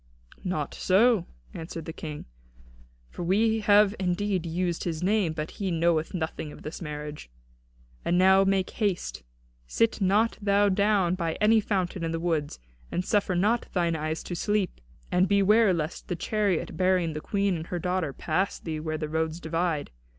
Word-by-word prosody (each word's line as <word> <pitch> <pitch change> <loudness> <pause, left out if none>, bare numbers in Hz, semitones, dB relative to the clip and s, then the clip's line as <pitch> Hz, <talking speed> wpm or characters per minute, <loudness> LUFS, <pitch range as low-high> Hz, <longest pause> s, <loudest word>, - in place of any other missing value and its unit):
"Not 155 -6 -2
so," 210 +1 +3 0.3
answered 165 -1 -7
the 160 - -6
King, 155 -3 -7 0.9
"for - - -7
we 220 +6 +2
have 210 -1 +5
indeed 185 -1 -1
used 175 +1 -1
his 165 -1 -3
name, 200 -3 +2
but 155 0 -4
he 195 - 0
knoweth 165 0 +1
nothing 160 -2 -4
of - - -12
this 155 - -7
marriage. 150 - -6 0.7
And 175 - +1
now 190 +1 +6
make 195 -1 +1
haste. 180 - -2 0.5
Sit 225 - +1
not 205 +4 +2
thou 205 0 +3
down 200 -2 +2
by 170 -3 -1
any 220 +1 +4
fountain 190 -4 -1
in 165 - -1
the 165 - -2
woods, 160 -4 -1 0.3
and 180 - -1
suffer 200 -3 +1
not 215 +7 +1
thine 170 -3 +1
eyes 155 +1 -3
to - - -6
sleep. 205 - -1 0.3
And 180 +2 +3
beware 200 +2 +4
lest 165 -2 -3
the 180 - -2
chariot 200 0 -1
bearing 185 -3 +2
the 150 - -5
Queen 200 +1 0
and 160 0 -6
her 180 - -3
daughter 180 -3 -1
pass 180 +8 -1
thee 160 -2 -5
where 155 0 -3
the 155 -1 -3
roads 160 +1 -2
divide. 165 -2 -2
180 Hz, 170 wpm, -27 LUFS, 160-200 Hz, 0.9 s, now